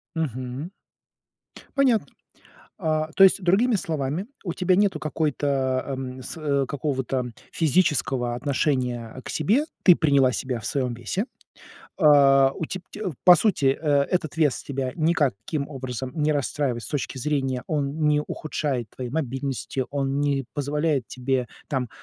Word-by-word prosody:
Мгм. 130 - -4 1.0
Понятно. 260 -5 +3 0.7
А 155 -3 0
то - - +4
есть, 195 - +5
другими 210 +6 +3
словами, 160 +2 -2 0.2
у 175 -5 -3
тебя 185 +1 +2
нету 205 -1 +2
какой-то, 140 -4 -1
ам, 130 -1 -5
с 140 -1 -1
какого-то 130 -2 -2 0.2
физического 135 -7 +1
отношения 125 -3 -1
к - - -6
себе, 220 - +2 0.2
ты 180 - +9
приняла 140 -5 +3
себя 125 -1 -3
в - - -7
своем 130 -4 -1
весе. 120 - -3 0.8
А, 135 -3 +6
у 160 - -4
теб 185 +2 -5
теб 205 -6 -4
по 180 -1 +9
сути, 170 -7 +2
э, 145 -3 +3
этот 170 -2 -1
вес 150 -5 +2
тебя 135 -2 -3
никаким 150 - 0
образом 130 -2 -5
не 155 0 +1
расстраивает 140 -3 -1
с - - -7
точки 140 -2 -3
зрения, 135 -3 -1
он 150 0 0
не 150 0 +3
ухудшает 140 -7 -3
твоей 125 -2 -6
мобильности, 135 -2 -2
он 140 0 -1
не 140 -3 0
позволяет 145 -2 0
тебе 130 -1 -1 0.2
там, 130 -5 -2
140 Hz, 140 wpm, -24 LUFS, 130-160 Hz, 1.0 s, ты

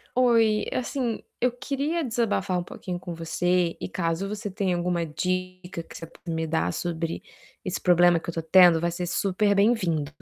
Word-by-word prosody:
Oi, 230 -4 +3
assim, 250 -3 -2 0.2
eu 250 +1 +2
queria 285 +6 -2
desabafar 220 -7 0
um - - -3
pouquinho 175 0 -6
com 175 -1 -6
você 175 +1 0
e - - -4
caso 170 +2 -2
você 205 0 -4
tenha 190 -2 -1
alguma 175 -1 -1
dica 185 +2 -3
que - - -14
você 165 - -7
possa 165 +1 -9
me 160 0 -2
dar 155 - 0
sobre 170 -1 -3 0.4
esse 185 -4 -3
problema 175 -1 +5
que - - -8
eu - - -4
tô 165 - -2
tendo, 175 0 +6
vai 170 - +1
ser 175 +1 -3
super 200 +3 +1
bem-vindo. 195 -8 +2
180 Hz, 180 wpm, -26 LUFS, 170-210 Hz, 0.4 s, tendo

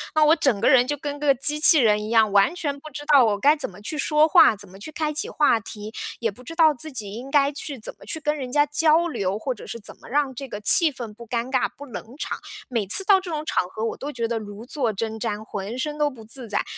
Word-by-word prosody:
那 310 - +5
我 310 +2 +6
整 270 -10 +1
个 235 - +4
人 255 -2 +5
就 290 +1 -2
跟 290 0 -5
个 285 -2 +3
机 295 +4 +1
器 310 +1 +8
人 210 -4 +3
一 - - -6
样， 220 -2 +3
完 200 - +3
全 285 -5 -3
不 310 - -11
知 290 0 -8
道 290 -3 +6
我 210 -2 +1
该 285 +9 +4
怎 295 - -4
么 185 0 -14
去 300 +9 -3
说 300 +1 +3
话， 265 - +6
怎 205 0 -11
么 190 +1 -15
去 310 - -7
开 305 0 -2
启 300 - -3
话 290 -6 +2
题。 210 0 -9 0.3
也 230 -2 -1
不 245 +6 -16
知 330 +6 -9
道 320 -2 +5
自 300 +4 -8
己 210 -6 -7
应 245 +5 -8
该 280 0 +3
去 285 -1 -5
怎 220 - -7
么 - - -14
去 320 - -5
跟 300 0 -1
人 255 -3 -6
家 290 +2 +3
交 320 +3 +2
流， 200 - -2
或 260 +3 -2
者 225 - -12
是 235 - -6
怎 205 - -10
么 - - -15
让 280 0 0
这 275 +2 -6
个 205 - -7
气 315 +9 +5
氛 240 -6 -8
不 235 +2 -13
尴 235 +2 -3
尬、 260 - +2
不 285 - -9
冷 245 -2 -9
场。 - - -4 0.3
每 230 -5 -1
次 390 - +4
到 390 -1 +5
这 370 - -9
种 305 -1 -4
场 180 - 0
合， 215 +3 -6
我 230 - -3
都 290 - -6
觉 235 -4 -2
得 230 0 -2
如 205 +1 -9
坐 250 -4 -2
针 220 +2 -4
毡， 215 -2 -3
浑 205 +2 -6
身 300 +2 -3
都 295 -1 +2
不 250 -5 -13
自 235 +2 -9
在。 205 -1 -1
260 Hz, 310 characters per minute, -23 LUFS, 220-300 Hz, 0.3 s, 器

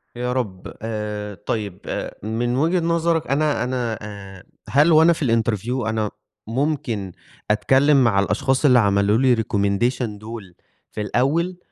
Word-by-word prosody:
يا 125 +1 -2
رب. 105 -8 -4
آآ، 105 -2 -4
طيب، 100 -5 -3
آآ - - -5
من 120 +3 -1
وجهة 165 +6 +2
نظرك 170 -1 0
أنا 145 -2 +1
أنا 125 -3 -2
آآ 100 -3 -10 0.3
هل 145 +5 +4
وأنا 160 +2 +6
في 160 - -3 0.2
الinterview 115 +2 -2
أنا 110 -2 -1 0.4
ممكن 115 - -2 0.4
أتكلم 135 +6 +4
مع 110 -5 +3
الأشخاص 130 +7 +1
اللي 125 -3 +6
عملوا 100 0 +3
لي 125 -1 +4
recommendation 105 +3 0 0.2
دُول 105 -4 -9 0.4
في - - -5
الأول، 155 - 0
120 Hz, 140 wpm, -22 LUFS, 105-140 Hz, 0.4 s, وأنا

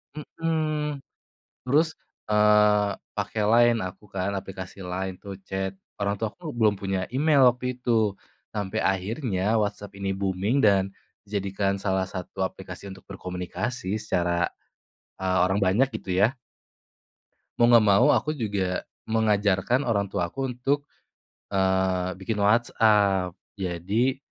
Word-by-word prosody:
Hmm. 155 -1 -2 0.7
Terus 155 +5 +2 1.2
pakai, 110 - -2
eee, - - +2
Line 120 0 +5
aku 95 - -14
kan 95 +1 -1
aplikasi 95 -1 -7
Line 95 +1 -3
atau 100 -1 -7
chat, 95 0 -2 0.3
orang 100 0 +1
tua 110 - -1
aku 170 -3 -8
belum 110 -2 +4
punya 95 -2 -1
email 145 0 +4
waktu 125 +1 -1
itu 110 -5 +1 0.4
sampai 100 -3 -2
akhirnya 100 +1 0
WhatsApp 105 -1 -3
ini 100 0 -2
booming 95 +4 0
dan 100 -2 +5 0.4
jadikan 100 -1 -1
salah 95 -1 0
satu 95 +1 -4
aplikasi 95 0 -7
untuk 95 - -11
berkomunikasi 95 +3 -4
secara, 85 0 +1 0.7
eee, 95 -1 +1
orang 95 +2 +1
banyak 100 +8 +3
gitu - - -8
ya. 110 +5 +4 1.3
Mau 120 - +5
enggak 115 -2 +7
mau, 100 +5 +6
aku 150 - +1
juga 100 -6 -1 0.2
mengajarkan 105 +2 +2
orang 100 -3 +2
tua 85 -1 0
aku 135 +6 -3
untuk, 140 +4 0 0.7
eee, 95 -1 +1
bikin 105 +2 -3
WhatsApp, 100 -4 +3 0.2
jadi 100 +7 -1
100 Hz, 125 wpm, -26 LUFS, 95-115 Hz, 1.3 s, enggak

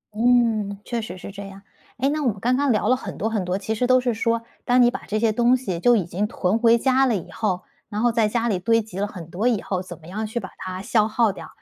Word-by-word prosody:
嗯， 225 -4 +2
确 235 -2 -2
实 185 -4 -7
是 195 - -8
这 200 0 -8
样， 195 0 -12 0.3
诶， 265 +2 +1
那 305 +1 -1
我 270 - +1
们 200 -4 -1
刚 250 +4 +1
刚 280 -1 +2
聊 215 - +1
了 255 - +4
很 255 - -7
多 220 - -1
很 210 -4 0
多， 180 +2 -1
其 215 +2 -3
实 245 +3 0
都 255 0 +5
是 245 -2 0
说 230 +1 0 0.2
当 245 0 +4
你 240 - +4
把 - - -6
这 215 - -1
些 225 -1 +2
东 240 +3 +3
西 190 -9 -4
就 240 +4 +5
已 190 -6 +1
经 190 +5 -2
囤 205 +2 0
回 230 0 +5
家 265 +2 +3
了 230 - +2
以 175 0 -9
后， 185 -4 -2 0.3
然 210 0 -4
后 240 - +4
在 225 -2 +2
家 235 +2 0
里 195 -6 0
堆 230 +4 +3
积 195 -3 -8
了 205 - 0
很 175 -6 -9
多 210 +7 0
以 230 -5 +2
后， 185 -2 -2
怎 185 - -9
么 160 - -17
样 215 +5 -4
去 235 +2 -3
把 190 - -8
它 185 +1 -6
消 220 -2 +2
耗 220 -1 +2
掉。 - - -9
220 Hz, 310 characters per minute, -23 LUFS, 195-240 Hz, 0.3 s, 都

